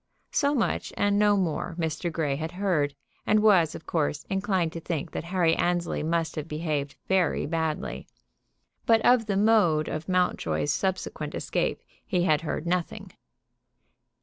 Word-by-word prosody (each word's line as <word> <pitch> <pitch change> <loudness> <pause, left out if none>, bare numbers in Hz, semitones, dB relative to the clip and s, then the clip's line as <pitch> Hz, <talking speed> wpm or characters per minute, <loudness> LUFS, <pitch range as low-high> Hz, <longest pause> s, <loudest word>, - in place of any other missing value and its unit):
So 285 -1 +2
much 235 - -1
and 205 0 +2
no 205 -1 +4
more 175 -1 -2
Mr. 165 +1 -2
Grey 155 -4 -1
had 160 +4 -5
heard, 175 -7 0 0.3
and 215 - +4
was, 180 -7 +4
of - - -9
course, 150 -3 -1
inclined 190 -4 0
to 165 - -5
think 165 -3 -4
that - - -5
Harry 170 -2 +2
Annesley 175 -1 0
must 165 +1 -1
have 155 0 -4
behaved 150 -3 -3
very 190 -2 +2
badly. 160 -1 -3 0.8
But 225 -1 +5
of 245 -3 +4
the 200 -2 0
mode 200 -8 +3
of 155 +3 -5
Mountjoy's 145 - +1
subsequent 190 -1 -3
escape - - -2 0.2
he 180 -2 0
had 155 -4 +3
heard 160 0 -3
nothing. 175 0 -2
170 Hz, 150 wpm, -27 LUFS, 155-195 Hz, 0.8 s, But